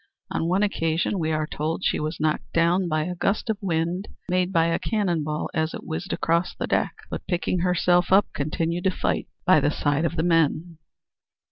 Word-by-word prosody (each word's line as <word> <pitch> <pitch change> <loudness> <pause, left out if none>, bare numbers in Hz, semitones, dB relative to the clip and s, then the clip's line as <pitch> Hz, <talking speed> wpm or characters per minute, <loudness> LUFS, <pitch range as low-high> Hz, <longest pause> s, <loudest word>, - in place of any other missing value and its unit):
On 165 - -1
one 185 +4 +2
occasion, 165 -1 0
we 160 -1 0
are 155 0 0
told, 155 +4 -3
she - - +1
was 155 +2 -3
knocked 155 0 -1
down 175 +2 +3
by 155 -2 0
a 180 +3 -3
gust 200 +5 0
of 210 - -4
wind 175 +1 -1 0.2
made 180 0 +1
by 165 -3 +3
a 165 0 +1
cannon 185 -8 0
ball 150 0 -2
as 160 0 -1
it - - -8
whizzed 160 +4 -5
across 170 +2 0
the - - -3
deck, - - 0 0.2
but - - -5
picking 175 0 0
herself 180 0 +2
up 195 +2 +6
continued 165 +4 -2
to - - +5
fight 185 - -1 0.2
by 185 -4 +6
the 145 - +2
side 145 +1 0
of 170 - -1
the 160 - 0
men. 165 0 +1
170 Hz, 205 wpm, -25 LUFS, 160-180 Hz, 0.2 s, up